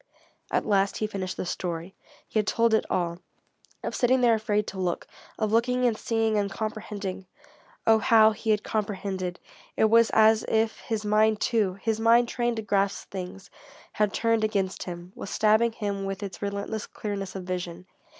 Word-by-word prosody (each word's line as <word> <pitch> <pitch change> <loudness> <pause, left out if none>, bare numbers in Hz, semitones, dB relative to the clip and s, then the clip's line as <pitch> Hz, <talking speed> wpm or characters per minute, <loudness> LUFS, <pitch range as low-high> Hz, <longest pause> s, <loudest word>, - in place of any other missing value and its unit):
At - - 0
last 200 -1 +2
he 215 - -1
had 210 - -6
finished 185 -2 -4
the - - -3
story. 175 0 -4 0.3
He 220 - 0
had 210 - -1
told 230 -1 +2
it 220 - +2
all; 170 -1 -1 0.6
of - - -3
sitting 255 0 +3
there 240 -2 +5
afraid 210 -1 0
to 190 - -7
look, 180 -2 -1 0.3
of 215 -2 -1
looking 250 +2 +2
and 235 -3 +3
seeing 225 -1 0
and 200 -1 -1
comprehending. 205 -3 -5 0.6
Oh 225 0 +5
how 220 0 +6
he 220 +1 -5
had 210 -1 +2
comprehended! 195 -4 -3 0.4
It 220 - +3
was 230 0 +6
as 220 0 +5
if 220 0 +1
his 220 -2 -3
mind 215 0 +3
too, 215 -6 +1
his 220 -1 0
mind 235 +1 +4
trained 240 -1 0
to 220 - -4
grasp 200 -1 0
things, 190 0 -7 0.4
had 210 -1 +1
turned 230 +1 +1
against 200 -3 -1
him, 175 0 -7
was - - -7
stabbing 220 +2 +3
him 200 -3 -3
with 195 +1 -4
its 195 -2 -7
relentless 200 +1 -3
clearness 195 -2 -5
of 190 - -5
vision. 180 -1 -5
210 Hz, 180 wpm, -27 LUFS, 195-220 Hz, 0.6 s, how